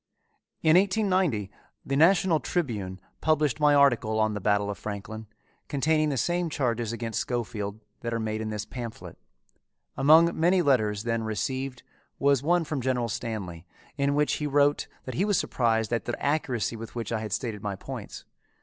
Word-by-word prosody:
In 160 +2 +6
1890 185 - +1 0.3
the 135 - -1
National 170 +1 +4
Tribune 105 - -3 0.2
published 150 -6 +1
my 150 -1 +5
article 120 -6 +3
on 110 0 +2
the 105 - -4
Battle 100 +1 +1
of 100 - -8
Franklin, 110 +1 -6 0.4
containing 155 +2 +1
the 140 - -1
same 175 +4 0
charges 120 -6 -1
against 115 -1 -3
Schofield 110 -4 -3 0.2
that 120 - -4
are 115 - -1
made 110 0 -2
in 110 - -3
this 105 -1 -4
pamphlet. 120 -1 -7 0.8
Among 160 +5 +6
many 175 +2 +4
letters 110 -8 +2
then 115 -1 -1
received 125 +5 -3 0.3
was 140 -2 +3
one 175 +4 +2
from 150 -3 -3
General 125 -2 0
Stanley 105 -8 -5 0.3
in 140 -1 +1
which 150 0 +2
he 150 - 0
wrote 145 0 +2 0.2
that 130 - -5
he 185 - 0
was 205 -3 +2
surprised 115 -2 0
at 115 - -1
the 120 - -3
accuracy 135 -6 -1
with 115 +1 -9
which 115 -1 -4
I 115 - 0
had 110 -1 -5
stated 110 -2 -3
my 100 -2 -3
points. - - -8
120 Hz, 170 wpm, -27 LUFS, 110-150 Hz, 0.8 s, In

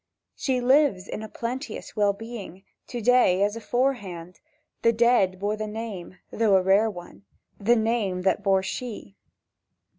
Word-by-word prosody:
"She 255 -2 -1
lives, 255 -7 +3
in - - -5
a 220 - -7
plenteous 255 +7 -6
well 205 -2 +3
being, 200 -3 -9 0.2
To 240 -2 -5
day 210 -5 +4
as 205 +1 0
aforehand; 210 -8 -2 0.4
The 230 - +4
dead 230 -5 +3
bore 205 +3 -1
the 215 0 -4
name—though 210 -1 -2
a 185 - +1
rare 200 +4 +4
one— 175 - -11 0.3
The 225 +4 +3
name 220 -5 0
that 190 +2 +1
bore 195 -1 +2
she." 210 - -6
210 Hz, 145 wpm, -25 LUFS, 190-235 Hz, 0.4 s, day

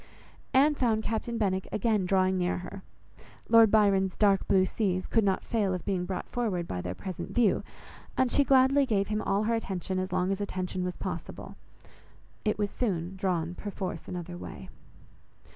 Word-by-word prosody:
Anne 285 +3 +5
found 230 -6 +1
Captain 230 +2 -2
Benwick 190 -3 0
again 210 -3 +1
drawing 190 0 +2
near 180 -1 0
her. 180 +2 -8 0.7
Lord 225 -1 +7
Byron's 195 -3 +3
"dark 200 -2 +3
blue 190 -1 +4
seas" 185 -2 -1
could 225 - +2
not 195 -1 +1
fail 205 -5 0
of 180 - -7
being 185 -3 -1
brought 185 0 -4
forward 200 -8 -2
by 90 - -3
their 90 0 -5
present 185 - -6
view, 235 -5 +3 0.6
and 260 -2 +2
she 285 - +4
gladly 270 +1 +4
gave 200 -4 +1
him 215 0 -1
all 200 0 0
her 230 +2 +1
attention 190 -4 -2
as 185 0 -3
long 185 +1 +1
as 195 +1 -2
attention 185 -2 -3
was 180 0 -3
possible. - - -6 0.9
It 215 - 0
was 205 -1 -1
soon 185 -6 -2
drawn, 175 -3 -1
perforce 190 -3 -5
another 175 0 -6
way. - - -9
195 Hz, 175 wpm, -29 LUFS, 185-220 Hz, 0.9 s, Lord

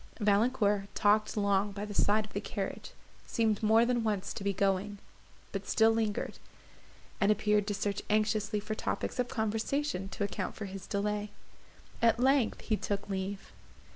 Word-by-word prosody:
Valancourt 205 -1 +2
talked 210 +1 +2
long 200 0 +2
by 200 +1 -5
the 210 - -7
side 210 +2 +3
of 210 - -16
the - - -2
carriage; - - -4 0.4
seemed 220 -3 +1
more 220 +2 +5
than 240 -1 +1
once 210 -4 -1
to - - -6
be 200 - +1
going, 200 +1 0 0.5
but - - -5
still 225 -1 +4
lingered, 220 -2 -1 0.8
and 205 0 +4
appeared 210 -1 +2
to 205 - 0
search 200 0 -2
anxiously 215 0 +1
for 215 +1 -4
topics 215 - -3
of 250 - +1
conversation 220 -1 -1
to 200 - -3
account 200 - -3
for 215 - -5
his 195 -1 -8
delay. 210 +1 -1 0.7
At 230 0 +4
length 265 -2 +3
he 215 - 0
took 200 0 -3
leave. 195 +1 -4
210 Hz, 165 wpm, -31 LUFS, 200-220 Hz, 0.8 s, more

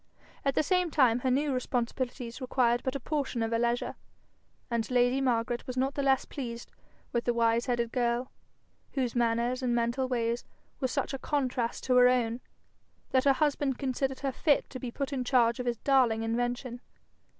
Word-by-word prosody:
At 275 -1 +1
the - - +3
same 360 +3 +2
time 255 -6 +3
her 260 - 0
new 280 +2 +1
responsibilities 245 0 -3
required 245 -2 +2
but 260 - -3
a - - -1
portion 270 -4 -2
of 225 - -2
her 230 - +1
leisure, 240 +1 0 0.7
and 235 -2 -2
lady 250 +1 +3
Margaret 240 -2 0
was 255 0 -5
not 265 +2 +1
the 280 - -2
less 270 -1 +2
pleased 235 -4 -6 0.4
with 235 -1 -1
the 240 - +1
wise 230 +1 +2
headed 235 -2 0
girl, 240 +1 0 0.6
whose 255 -4 -1
manners 240 +2 +1
and 245 -2 +1
mental 240 +3 0
ways 235 -1 -1 0.4
were 260 - +1
such 255 - -2
a 270 - -3
contrast 255 -5 -1
to 255 -1 +3
her 250 0 +8
own, 245 -1 +1 0.7
that 260 +1 +3
her 275 - +6
husband 285 -2 0
considered 265 0 -2
her 275 -1 -1
fit 290 +3 +1
to 255 - -6
be 250 - -4
put 275 +4 -4
in 260 -2 -1
charge 240 -2 +3
of 250 - -3
his 240 -1 0
darling 245 -4 +3
invention. 245 +2 -2
250 Hz, 185 wpm, -29 LUFS, 235-265 Hz, 0.7 s, her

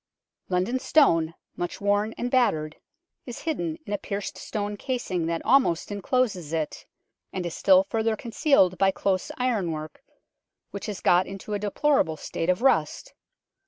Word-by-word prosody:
London 190 +8 0
Stone, 165 - +3 0.2
much 175 - -4
worn 205 +2 +1
and 245 +1 -3
battered, 160 -12 +1 0.5
is 245 - -7
hidden 320 0 -2
in 205 - -4
a 205 - -1
pierced 200 +1 -4
stone 205 -1 -4
casing 200 -8 -2
that 165 0 -3
almost 235 -11 +3
encloses 200 - -1
it, 160 -2 -3 0.4
and 185 -2 -4
is 170 - -3
still 285 0 +5
further 225 -5 0
concealed 230 - +2
by 195 - +5
close 190 -1 -1
ironwork, 175 -12 -2 0.7
which 200 +1 -6
has 205 -3 -5
got 180 +1 +4
into 195 +2 -7
a 205 - -1
deplorable 210 - +1
state 165 - -4
of 185 +6 +1
rust. 270 - +1
205 Hz, 150 wpm, -26 LUFS, 175-245 Hz, 0.7 s, still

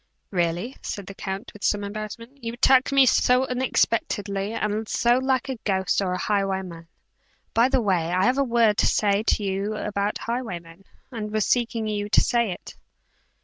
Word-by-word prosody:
"Really," 175 +7 -1
said 200 - -5
the 195 - -9
count, 195 +3 -6
with 210 - -13
some 205 -1 +1
embarrassment, 215 +6 -7
"you 230 0 -3
attack 260 +2 +4
me 275 -1 +6
so 250 +1 +3
unexpectedly, 215 -5 0
and 215 -1 -2
so 240 +1 +3
like 260 0 0
a 265 -2 -4
ghost 195 -2 0
or 185 -2 -1
a - - -1
highwayman 190 -5 -2 0.7
by 235 +3 +4
the 265 -2 +2
way 175 -5 +1
I 185 +1 +2
have 255 +3 +2
a - - +4
word 230 -4 +2
to - - +4
say 205 -1 +2
to 220 -1 +1
you 200 +2 -2
about 205 -1 -2
highwaymen, 195 -7 -5 0.3
and 220 -3 -5
was 215 -1 +1
seeking 235 -2 0
you 210 -1 -2
to - - +5
say 235 -2 +1
it." 175 - -8
210 Hz, 180 wpm, -24 LUFS, 195-240 Hz, 0.7 s, me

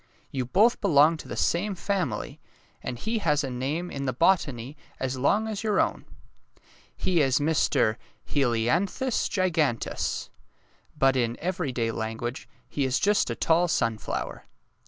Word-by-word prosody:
You 130 -2 -2
both 215 - +3
belong 155 +2 +5
to - - -10
the - - -5
same 195 +4 +1
family, 180 - -2 0.4
and 120 - -4
he 225 - -2
has 150 -6 +1
a 135 - -3
name 145 +8 -3
in 140 0 -4
the 130 - 0
botany 140 -4 +1 0.2
as 130 0 -2
long 200 +12 +2
as 215 -1 -4
your 215 -2 +1
own. - - 0 0.9
He 175 -4 +2
is 135 -3 +3
Mr. 145 -7 +2 0.3
He 145 - +1
li 115 -3 +1
an 175 +10 +3
thus 260 -3 0
Gi 185 -3 +1
gan 150 -8 +2
teus, - - -3 0.7
but 135 0 +4
in 120 -2 0
every 175 -4 -2
day 115 -2 -1
language 115 +3 -4 0.2
he 145 - -2
is 130 0 +1
just 210 0 +2
a - - -2
tall 170 +2 +3
sunflower." 115 -9 -2
145 Hz, 165 wpm, -27 LUFS, 125-185 Hz, 0.9 s, belong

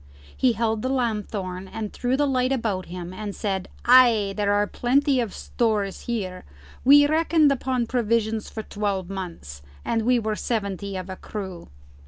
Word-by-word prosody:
He 255 -2 +3
held 225 -1 0
the 255 - -1
lanthorn 210 -7 -2
and 215 +1 -6
threw 250 +1 0
the 290 - +2
light 255 -2 +1
around 220 -8 -1
him 180 0 -7
and 205 +1 -6
said, 195 -3 -2 0.2
"Ay, 235 -5 +6
there 205 -1 +1
are 205 0 +3
plenty 270 +5 +1
of 230 -5 -1
stores 210 -4 -1
here. 190 -6 -3 0.4
We 290 +3 +8
reckoned 310 0 +3
upon 255 -2 0
provisions 225 -2 0
for 220 - -6
twelve 200 -3 -3
months, 170 - -7 0.2
and 230 - 0
we 245 +2 +3
were 215 -2 -1
seventy 200 -4 -3
of 185 0 -6
a 190 -1 -7
crew." 190 -5 -7
220 Hz, 165 wpm, -24 LUFS, 195-250 Hz, 0.4 s, We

